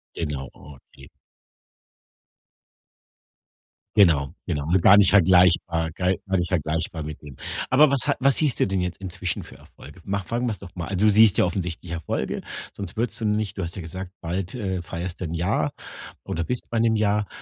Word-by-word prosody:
Genau, 75 Hz, -5 st, -4 dB
okay. 70 Hz, -1 st, -15 dB, 2.9 s
Genau, 80 Hz, -9 st, +4 dB
genau, 75 Hz, +1 st, -2 dB
halt 95 Hz, -1 st, +4 dB
gar 100 Hz, -, +8 dB
nicht 100 Hz, -2 st, +6 dB
vergleichbar 90 Hz, -3 st, +4 dB
gar 90 Hz, +3 st, 0 dB, 0.2 s
nicht 90 Hz, -, 0 dB
vergleichbar 80 Hz, -1 st, -2 dB
mit 75 Hz, 0 st, -7 dB
dem, 70 Hz, -3 st, -11 dB, 0.3 s
aber 145 Hz, +3 st, +6 dB
was 140 Hz, -2 st, +3 dB
ha -, -, +2 dB
was 135 Hz, 0 st, +4 dB
siehst 150 Hz, -6 st, +1 dB
du -, -, +5 dB
denn 95 Hz, -1 st, -1 dB
jetzt 90 Hz, 0 st, -3 dB
inzwischen 90 Hz, -1 st, -4 dB
für -, -, -13 dB
Erfolge? -, -, -15 dB
Mach 100 Hz, -1 st, -2 dB
fangen 120 Hz, +2 st, -1 dB
wir's 110 Hz, -3 st, -3 dB
doch 90 Hz, -3 st, -11 dB
mal 90 Hz, +2 st, -4 dB
du 105 Hz, +3 st, +4 dB
siehst 105 Hz, -1 st, +6 dB
ja -, -, +5 dB
offensichtlich 90 Hz, -1 st, -3 dB
Erfolge, 85 Hz, -1 st, -3 dB, 0.3 s
sonst 100 Hz, +1 st, -7 dB
würdest 115 Hz, -1 st, -2 dB
du 115 Hz, -, -3 dB
nicht 105 Hz, -1 st, -1 dB
du 95 Hz, -, -2 dB
hast 85 Hz, -, -4 dB
ja 95 Hz, -, -5 dB
gesagt, 90 Hz, +3 st, -7 dB
bald, 90 Hz, +5 st, -3 dB
äh, 95 Hz, -6 st, -2 dB
feierst 85 Hz, +1 st, -6 dB
du 90 Hz, -, -3 dB
1 80 Hz, -, -4 dB
Jahr 85 Hz, -3 st, 0 dB, 0.5 s
oder 85 Hz, 0 st, -3 dB
bist 125 Hz, -, -3 dB
bei 115 Hz, -, -1 dB
1 115 Hz, -1 st, +3 dB
Jahr. 105 Hz, -1 st, +1 dB
90 Hz, 185 wpm, -24 LUFS, 85-105 Hz, 2.9 s, gar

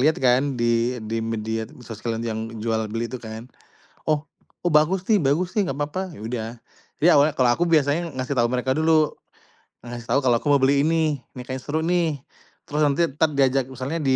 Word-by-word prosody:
lihat 155 Hz, +3 st, +4 dB
kan 130 Hz, +1 st, +2 dB
di 120 Hz, +1 st, +1 dB
di 115 Hz, +1 st, -2 dB
media 110 Hz, 0 st, -3 dB, 0.2 s
sosial 115 Hz, +1 st, -4 dB
yang 110 Hz, -1 st, -3 dB, 0.2 s
jual 110 Hz, -1 st, +1 dB
beli 115 Hz, +1 st, -2 dB
itu 125 Hz, -, -5 dB
kan, 110 Hz, +1 st, -8 dB, 0.6 s
oh 150 Hz, -1 st, +2 dB, 0.4 s
"oh 175 Hz, -, +2 dB
bagus 170 Hz, +5 st, +3 dB
nih 210 Hz, -, +5 dB
bagus 160 Hz, +7 st, +1 dB
nih 205 Hz, -4 st, +1 dB
gapapa" 145 Hz, +7 st, -3 dB
ya -, -, -12 dB
udah 115 Hz, -1 st, -3 dB, 0.5 s
jadi 170 Hz, +4 st, +5 dB
awalnya 145 Hz, +1 st, +4 dB
kalau 125 Hz, -2 st, +4 dB
aku 170 Hz, -, 0 dB
biasanya 155 Hz, +2 st, +2 dB
ngasih 130 Hz, +2 st, -2 dB
tahu 120 Hz, -, +4 dB
mereka 125 Hz, +1 st, 0 dB
dulu, 155 Hz, +1 st, +3 dB, 0.7 s
ngasih 120 Hz, -1 st, -8 dB
tahu 140 Hz, -, +4 dB
kalau 120 Hz, -2 st, +4 dB
aku 145 Hz, -, -2 dB
mau 140 Hz, -, +6 dB
beli 140 Hz, +1 st, +3 dB
ini 155 Hz, -3 st, +1 dB, 0.2 s
ini -, -, -5 dB
kayaknya 130 Hz, -1 st, -4 dB
seru 155 Hz, +2 st, -1 dB
nih, 170 Hz, -4 st, +1 dB, 0.5 s
terus 150 Hz, +1 st, -2 dB
nanti 145 Hz, +4 st, +3 dB
tetep 150 Hz, +2 st, 0 dB
diajak 135 Hz, -1 st, +3 dB
misalnya 130 Hz, +6 st, -4 dB
135 Hz, 190 wpm, -23 LUFS, 120-155 Hz, 0.7 s, mau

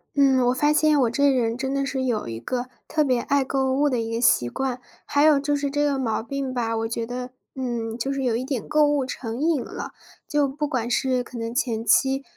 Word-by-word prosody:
嗯， 265 Hz, -3 st, +4 dB
我 250 Hz, -, +3 dB
发 295 Hz, +3 st, +2 dB
现 305 Hz, -1 st, +3 dB
我 245 Hz, -, +3 dB
这 280 Hz, +5 st, +3 dB
人 235 Hz, -4 st, +1 dB
真 265 Hz, +1 st, -2 dB
的 275 Hz, 0 st, 0 dB
是 265 Hz, -1 st, -2 dB
有 235 Hz, -, -1 dB
一 115 Hz, -1 st, -5 dB
个 245 Hz, -, -3 dB, 0.2 s
特 310 Hz, -, +1 dB
别 255 Hz, -5 st, +2 dB
爱 280 Hz, +1 st, +1 dB
购 265 Hz, -1 st, 0 dB
物 290 Hz, +2 st, +2 dB
的 250 Hz, -, 0 dB
一 225 Hz, 0 st, -4 dB
个 230 Hz, -, -1 dB
习 125 Hz, -, +3 dB
惯， 255 Hz, -, -3 dB, 0.2 s
还 285 Hz, +1 st, +2 dB
有 300 Hz, -2 st, +6 dB
就 290 Hz, +1 st, 0 dB
是 285 Hz, -1 st, -2 dB
这 290 Hz, +1 st, +1 dB
个 285 Hz, -1 st, +1 dB
毛 235 Hz, -5 st, -1 dB
病 270 Hz, +2 st, -4 dB
吧， 230 Hz, -2 st, -1 dB
我 225 Hz, 0 st, -1 dB
觉 230 Hz, 0 st, -2 dB
得， 250 Hz, +1 st, -5 dB, 0.3 s
嗯， 235 Hz, -3 st, -3 dB
就 270 Hz, +3 st, -2 dB
是 275 Hz, 0 st, -2 dB
有 235 Hz, -3 st, +1 dB
一 240 Hz, -, -2 dB
点 260 Hz, -4 st, -3 dB
购 300 Hz, 0 st, +4 dB
物 290 Hz, -2 st, +1 dB
成 235 Hz, -2 st, -5 dB
瘾 310 Hz, -3 st, +1 dB
了。 -, -, -7 dB, 0.4 s
就 295 Hz, -2 st, +1 dB
不 295 Hz, +2 st, -3 dB
管 245 Hz, -5 st, -2 dB
是 255 Hz, 0 st, +1 dB
可 245 Hz, -, -10 dB
能 230 Hz, +1 st, -4 dB
前 230 Hz, -3 st, -1 dB
期， 270 Hz, +3 st, +3 dB
260 Hz, 260 characters per minute, -24 LUFS, 235-280 Hz, 0.4 s, 有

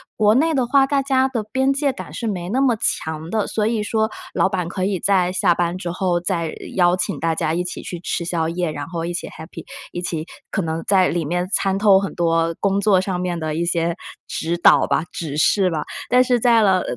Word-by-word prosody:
国 210 Hz, 0 st, +4 dB
内 320 Hz, +5 st, +3 dB
的 260 Hz, -4 st, +1 dB
话， 275 Hz, +2 st, +4 dB
大 275 Hz, 0 st, +1 dB
家 265 Hz, -1 st, +2 dB
的 245 Hz, -5 st, -3 dB
边 265 Hz, +2 st, +2 dB
界 280 Hz, 0 st, +1 dB
感 -, -, -9 dB
是 230 Hz, -, -4 dB
没 180 Hz, -4 st, -3 dB
那 260 Hz, +5 st, +1 dB
么 255 Hz, -4 st, +3 dB
强 160 Hz, -6 st, -2 dB
的。 215 Hz, -2 st, 0 dB
所 215 Hz, -, -1 dB
以 225 Hz, 0 st, 0 dB
说 220 Hz, +1 st, 0 dB, 0.2 s
老 -, -, +3 dB
板 180 Hz, -3 st, -2 dB
可 185 Hz, 0 st, -2 dB
以 195 Hz, -2 st, -1 dB
在 185 Hz, -3 st, +2 dB
下 180 Hz, -1 st, +2 dB
班 175 Hz, +1 st, -1 dB
之 180 Hz, -, -4 dB
后 180 Hz, -1 st, 0 dB
再 170 Hz, -3 st, -2 dB, 0.2 s
邀 175 Hz, -1 st, +4 dB
请 185 Hz, -, -2 dB
大 165 Hz, 0 st, 0 dB
家 155 Hz, 0 st, -1 dB
一 175 Hz, -, 0 dB
起 180 Hz, -, -6 dB
去 175 Hz, -, -6 dB
吃 175 Hz, -, -2 dB
宵 165 Hz, -2 st, -1 dB
夜， 175 Hz, -1 st, -2 dB
然 145 Hz, -1 st, -5 dB
后 165 Hz, -1 st, -4 dB
一 175 Hz, -, -3 dB
起 175 Hz, -, -4 dB
Happy， 160 Hz, +2 st, -10 dB, 0.3 s
一 175 Hz, -, -5 dB
起 160 Hz, -3 st, -3 dB, 0.3 s
可 195 Hz, -, 0 dB
能 165 Hz, 0 st, -3 dB
在 190 Hz, -2 st, +4 dB
里 170 Hz, -2 st, -1 dB
面 175 Hz, +4 st, -1 dB
掺 195 Hz, -1 st, +1 dB
透 200 Hz, -2 st, +6 dB
很 195 Hz, -, -4 dB
多 165 Hz, -1 st, +1 dB
工 200 Hz, 0 st, +1 dB
作 200 Hz, -2 st, +3 dB
上 190 Hz, -2 st, -3 dB
面 180 Hz, -1 st, -2 dB
的 155 Hz, -1 st, -3 dB
一 170 Hz, +2 st, -1 dB
些 170 Hz, 0 st, 0 dB, 0.3 s
指 170 Hz, +1 st, -2 dB
导 -, -, +6 dB
吧、 -, -, +1 dB
指 155 Hz, -4 st, -5 dB
示 190 Hz, +4 st, +3 dB
吧。 155 Hz, -, -2 dB, 0.3 s
但 250 Hz, 0 st, +5 dB
是 245 Hz, -1 st, +1 dB
在 230 Hz, -1 st, +4 dB
了 190 Hz, -3 st, +3 dB
185 Hz, 270 characters per minute, -21 LUFS, 170-215 Hz, 0.3 s, 透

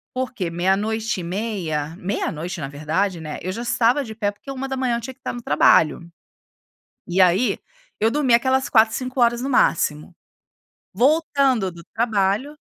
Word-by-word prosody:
Por 255 Hz, 0 st, -2 dB
quê? 185 Hz, -7 st, -3 dB
Meia-noite 205 Hz, +5 st, 0 dB
e -, -, -5 dB
meia, 170 Hz, -6 st, -3 dB
meia-noite 180 Hz, -2 st, -3 dB
na 140 Hz, -, -4 dB
verdade, 160 Hz, +6 st, -2 dB
né, 155 Hz, -1 st, -6 dB
eu 185 Hz, -, -2 dB
já 230 Hz, -, -5 dB
estava 240 Hz, +3 st, +2 dB
de 220 Hz, -3 st, -9 dB
pé, 205 Hz, -2 st, -1 dB
porque 205 Hz, +7 st, -15 dB
1:00 265 Hz, -2 st, -2 dB
eu -, -, -6 dB
tinha 260 Hz, +3 st, -7 dB
que 260 Hz, -, -39 dB
estar -, -, -4 dB
no 240 Hz, -1 st, -8 dB
trabalho. 155 Hz, +1 st, +3 dB, 1.0 s
E 180 Hz, +2 st, 0 dB
aí, 185 Hz, +6 st, +4 dB, 0.4 s
eu 220 Hz, +2 st, +3 dB
dormi 270 Hz, -2 st, +2 dB
aquelas 260 Hz, +2 st, +2 dB
quatro 220 Hz, -2 st, +5 dB
4 220 Hz, -, -8 dB
5 255 Hz, 0 st, -4 dB
horas 240 Hz, 0 st, +3 dB
no 270 Hz, -, -2 dB
máximo. 155 Hz, -, +1 dB, 0.8 s
Voltando 270 Hz, -, +2 dB
do 170 Hz, 0 st, -12 dB
trabalho 220 Hz, +4 st, 0 dB
220 Hz, 170 wpm, -22 LUFS, 180-255 Hz, 1.0 s, quatro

